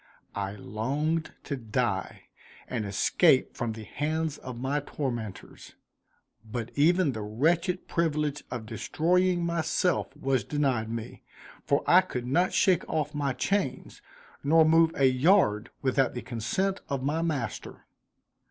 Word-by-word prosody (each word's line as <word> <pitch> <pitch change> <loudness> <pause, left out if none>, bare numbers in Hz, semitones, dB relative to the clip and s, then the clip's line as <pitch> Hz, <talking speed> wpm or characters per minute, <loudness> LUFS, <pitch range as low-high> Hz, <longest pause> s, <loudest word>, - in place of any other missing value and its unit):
I 100 -1 -3
longed 140 +11 -2
to 140 - -3
die, 115 -5 -2 0.4
and 115 -4 -3
escape 130 - +3
from 120 -3 -2
the 110 0 -8
hands 155 +5 -2
of 125 -2 -8
my 135 +3 0
tormentors; 120 -8 -6 0.7
but 115 +1 -5
even 165 +2 +3
the 110 -3 -5
wretched 165 - 0
privilege 150 -3 -1
of 120 -3 -5
destroying 175 - +1
myself 170 +2 0
was 135 -4 0
denied 130 -4 0
me, 115 +1 -6 0.5
for 140 - +2
I 180 +2 +7
could 125 -9 -5
not 175 +9 +2
shake 185 -3 +3
off 150 -2 -1
my 145 -2 -1
chains, 180 -6 -2 0.4
nor 160 +3 +5
move 165 +1 +5
a 135 - +3
yard 130 - +3
without 130 -1 +1
the 120 - -5
consent 130 - -2
of 135 -2 -2
my 150 +4 0
master. 145 - -4
140 Hz, 135 wpm, -28 LUFS, 120-165 Hz, 0.7 s, I